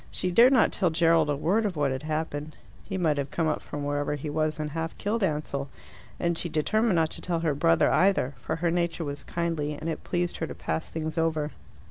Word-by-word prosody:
She 185 - -2
dared 235 +8 +7
not 255 -5 +4
tell 185 - +2
Gerald 165 -1 +3
a 145 - +1
word 190 +10 +1
of 200 -4 -1
what 145 -3 +1
had 130 - -3
happened: 155 -1 -3 0.3
he 195 - -4
might 155 -5 +1
have 140 0 -2
come 165 +1 0
up 155 - 0
from 145 -1 -5
wherever 145 0 -1
he 145 +1 -5
was 155 0 0
and 150 -1 -3
half 165 +1 -4
killed 220 +3 -1
Ansell. 150 -4 -1 0.5
And 170 0 +1
she 175 - -2
determined 215 +7 +2
not 160 -1 +2
to - - -2
tell 170 -2 -1
her 160 -3 +1
brother 85 -12 +3
either, 185 -8 +3
for - - -2
her 170 +1 0
nature 170 -1 0
was 145 0 -5
kindly, 165 -3 -2
and 155 +2 -6
it 165 - -3
pleased 175 -1 -1
her 160 - -2
to - - -7
pass 160 - -3
things 160 0 -3
over. 155 -2 0
160 Hz, 230 wpm, -27 LUFS, 150-175 Hz, 0.5 s, dared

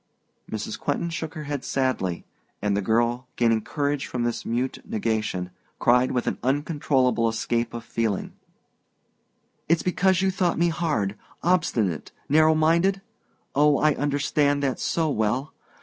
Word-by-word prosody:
Mrs. - - -4
Quentin 170 - -1
shook 160 0 -5
her 155 - -5
head 145 -2 -4
sadly, 130 -10 -1 0.3
and 105 -1 0
the 100 - +1
girl, 120 +5 +1
gaining 115 -2 +2
courage 145 +4 -2
from 125 -1 -2
this 120 -1 -2
mute 125 +3 -1
negation, 110 -5 -2 0.3
cried 125 +1 +3
with 125 - -1
an - - -2
uncontrollable 130 -4 +1
escape 115 +1 -1
of 120 -1 -6
feeling: 115 -4 -2 1.4
"It's 165 0 +3
because 185 0 +2
you 190 - +3
thought 180 -2 0
me 170 +1 +3
hard, 145 - -1 0.2
obstinate 120 - +1 0.2
narrow 155 +2 +5
minded? 170 +5 +3 0.5
Oh, 145 0 +4
I 155 -1 +3
understand 145 0 +1
that 135 -2 0
so 165 -1 0
well! 125 +1 -1
135 Hz, 140 wpm, -25 LUFS, 115-155 Hz, 1.4 s, narrow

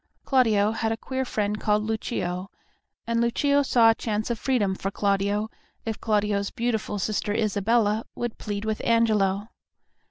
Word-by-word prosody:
Claudio 220 -6 +3
had 225 0 -1
a 225 - -1
queer 260 +3 -3
friend 210 -4 -2
called 210 0 +1
Lucio, 195 -4 -3 0.6
and 230 0 0
Lucio 280 +5 +2
saw 235 -4 +5
a - - +2
chance 215 0 -2
of 230 - -3
freedom 225 -8 +1
for 190 +1 -3
Claudio 200 +1 0 0.4
if 225 -2 -4
Claudio's 205 -2 +1
beautiful 225 -3 -2
sister 205 +1 -1
Isabella 215 +1 +1
would 240 -2 -4
plead 205 0 -4
with 220 -1 -2
Angelo. 215 -3 +2
215 Hz, 150 wpm, -25 LUFS, 205-230 Hz, 0.6 s, saw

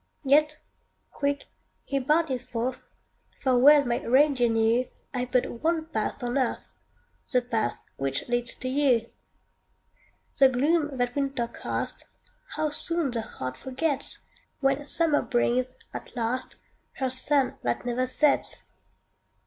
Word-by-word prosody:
Yet 300 +2 +4 0.5
quick 285 0 -1 0.4
he 275 - -1
bounded 290 -1 +1
forth; 245 +1 -3 0.6
For 260 -2 +2
well 285 +3 +7
my 240 -1 -1
reindeer 260 -1 +4
knew 225 +2 +2 0.3
I've 250 -1 -2
but 245 -2 0
one 325 0 +1
path 220 -4 -3
on 245 +3 0
earth 255 - -1 0.7
The 250 -3 +3
path 230 -3 -1 0.2
which 135 0 -2
leads 240 0 0
to 255 - -5
you. 255 -4 +2 1.3
The 270 -1 +8
gloom 290 +2 +1
that 245 0 -1
winter 275 -4 -1
cast, - - -5 0.5
How 310 0 0
soon 330 -1 -1
the 235 -1 -2
heart 130 -11 -6
forgets, 270 - -2 0.4
When 275 +1 +1
summer 320 -2 +3
brings, 250 +1 0 0.2
at - - -8
last, 245 +2 -2 0.4
Her 260 -1 -2
sun 270 +1 +1
that 120 - -2
never 250 +1 0
sets! 285 +3 +1
260 Hz, 130 wpm, -27 LUFS, 240-290 Hz, 1.3 s, The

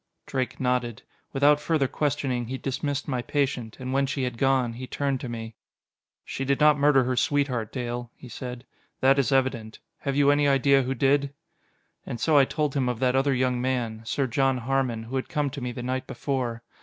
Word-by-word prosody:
Drake 130 -2 -3
nodded. 125 -2 -1 0.3
Without 145 +2 +4
further 150 -2 +1
questioning 135 -4 -1
he 130 +2 -4
dismissed 140 +2 -3
my 130 -4 -1
patient; 125 -3 -2
and 130 0 -4
when 135 0 +2
she 135 -1 -2
had 125 -2 -3
gone, 130 -3 +2
he 130 +2 -7
turned 140 -1 -1
to 125 - -5
me. 115 -1 -6 0.7
"She 135 - -4
did 135 0 +1
not 150 0 +6
murder 140 -2 +5
her 125 +1 -1
sweetheart, 125 -4 0
Dale" 120 -2 -4
he - - -12
said. 125 +1 -7 0.4
"That 135 +1 +5
is 140 +1 +1
evident. 130 -5 0 0.2
Have 140 -1 -2
you 145 0 +5
any 145 0 +3
idea 140 0 +4
who 130 +1 -2
did?" 140 +2 +2 0.7
And 120 - -6
so 155 +5 +2
I 140 -2 +7
told 150 0 -1
him 130 -3 +1
of 125 - -2
that 130 -1 +2
other 135 0 +2
young 125 -1 +1
man. 120 -4 -1
Sir 115 +5 -1
John 135 +1 +1
Harmon, 125 -2 -1
who 125 +4 -4
had 130 - -3
come 150 -4 -1
to 140 0 -7
me 125 0 -3
the 120 0 -6
night 130 +1 -2
before. 125 -4 -3
130 Hz, 205 wpm, -26 LUFS, 125-140 Hz, 0.7 s, I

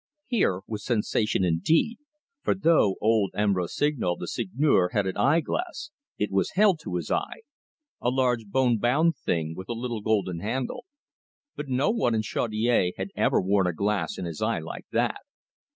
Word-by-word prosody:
Here 195 - +1
was 105 -2 -6
sensation 110 -4 0
indeed, 95 - +2 0.4
for - - +1
though 165 - +3
old 110 -2 +3
M. 105 -1 +2
Rossignol, 95 - 0
the - - -7
Seigneur, 100 -4 +1
had 105 -2 +1
an 95 - -2
eye 140 +10 +3
glass, 310 - -4 0.3
it 105 - -1
was 95 0 0
held 195 -4 +4
to 90 - -5
his 85 -3 -3
eye - - -2 0.6
a 120 - +1
large 125 -3 +1
bone 120 +1 +2
bound 150 +9 +2
thing 80 -1 -2
with 95 - -9
a - - -1
little 120 -1 -4
gold 105 -2 +1
handle; 120 +5 -3 0.7
but 150 - -6
no 130 +10 +2
one 210 - +1
in 110 - 0
Chaudiere 110 -3 +1
had - - -4
ever - - +2
worn 95 0 +2
a 90 - 0
glass 100 +4 -1
in 90 - -4
his 85 -3 -6
eye - - +1
like - - -8
that. - - 0
110 Hz, 175 wpm, -26 LUFS, 95-140 Hz, 0.7 s, held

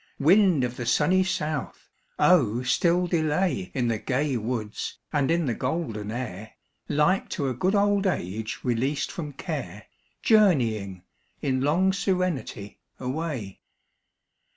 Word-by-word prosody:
Wind 175 -1 +5
of 125 0 -3
the 120 - -4
sunny 175 +10 +3
south! 155 -6 -3 0.3
oh 125 -9 +4
still 175 +7 +2
delay 175 +3 0
In 125 -3 +1
the 115 -2 0
gay 135 +3 -1
woods 110 -2 -3 0.2
and 145 -3 +1
in 170 0 +2
the 125 - 0
golden 125 -6 -3
air, 110 -3 -6 0.4
Like 150 +6 +2
to 140 -5 0
a - - -1
good 185 - 0
old 200 -1 +3
age 110 - -3
released 130 +4 0
from 155 -5 -5
care, 135 - -6 0.4
Journeying, 115 - +3 0.4
in 130 -2 0
long 175 +7 +2
serenity, 180 - -2 0.2
away. 130 - -4
140 Hz, 130 wpm, -26 LUFS, 120-180 Hz, 0.4 s, Wind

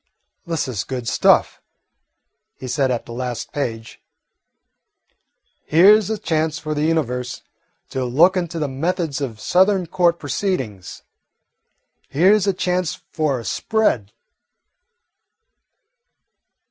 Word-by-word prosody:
"This 165 -4 -1
is 115 -7 -3
good 125 -3 -5
stuff," - - +3 0.9
he 130 - -8
said 130 +2 0
at 120 -2 -2
the - - -11
last 125 0 -5
page. 115 -6 -4 1.7
"Here 195 +7 +6
's 205 - -6
a 220 - -1
chance 160 -5 -1
for 155 -1 -4
the 150 - -2
Universe 125 -6 -2 0.5
to 130 - -2
look 155 +10 +4
into 170 -2 -2
the 155 -2 -1
methods 155 +1 -2
of 115 -6 -4
Southern 190 - +2
court 170 0 +2
proceedings. 130 - -4 1.1
Here 180 +8 +4
's 210 -2 +2
a 195 - +3
chance 180 -1 -1 0.2
for 150 -5 0
a 115 - -9
spread." 170 - 0
155 Hz, 120 wpm, -21 LUFS, 125-180 Hz, 1.7 s, Here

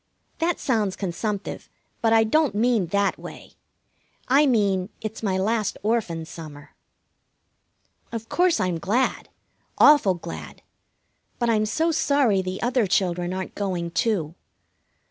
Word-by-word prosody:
That 335 +1 0
sounds 215 -7 0
consumptive, 200 +2 -4 0.3
but 225 - +2
I 225 0 +5
don't 285 +2 +2
mean 225 -4 +2
that 200 +3 0
way. - - -11 0.7
I 280 +3 +4
mean 200 -6 +1
it's 215 0 -6
my 195 -4 0
last 210 +2 0
Orphan 205 -8 -1
summer. 155 -3 -11 1.4
Of 225 -1 -5
course, 355 -1 +2
I'm 180 -3 -1
glad, 225 +9 0 0.5
awful 290 -11 +6
glad; 80 - -9 0.7
but 235 -1 +1
I'm 215 -1 +1
so 320 +10 +1
sorry 280 -10 +2
the 185 0 -5
other 240 -3 +1
children 180 -2 0
aren't 185 0 -5
going, 180 -4 -3
too. 170 -7 0
210 Hz, 125 wpm, -24 LUFS, 185-235 Hz, 1.4 s, awful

